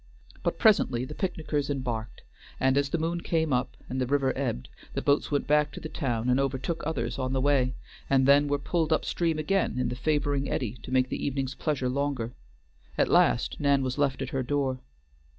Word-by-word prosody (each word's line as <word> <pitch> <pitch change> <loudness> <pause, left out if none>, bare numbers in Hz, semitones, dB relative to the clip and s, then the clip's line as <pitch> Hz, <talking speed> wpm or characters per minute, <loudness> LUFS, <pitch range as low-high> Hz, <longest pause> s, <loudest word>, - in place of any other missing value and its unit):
But - - -1
presently 165 - +3
the - - -7
picnickers 155 -6 -2
embarked, 125 -5 -4 0.4
and, 130 0 +3
as 140 0 +2
the 170 - 0
moon 165 +2 -1
came 160 -4 0
up, 125 +1 -1
and 130 +1 -3
the 125 - 0
river 135 0 +2
ebbed, 95 - -2 0.3
the - - 0
boats 145 0 +2
went 145 -1 0
back 150 0 +3
to - - -7
the 155 - -7
town 120 -7 -2
and 125 +1 +3
overtook 135 +4 -1
others 125 -5 -2
on 130 0 -1
the 135 - +1
way, 130 -2 +2 0.3
and 135 -1 +4
then 145 +1 +6
were 145 0 +1
pulled 160 +2 -1
up 155 - +2
stream 165 -2 0
again 155 -2 0
in 125 - 0
the - - -3
favoring 145 0 0
eddy 120 -1 -2
to - - -9
make 130 0 +2
the - - -3
evening's 135 -1 -1
pleasure 140 -3 -1
longer; 130 -3 -1 0.6
at - - +2
last - - +3
Nan 140 -1 +3
was 130 +2 -2
left 140 -2 +1
at 130 - -5
her 135 - -1
door. 135 -1 -1
135 Hz, 205 wpm, -28 LUFS, 130-145 Hz, 0.6 s, then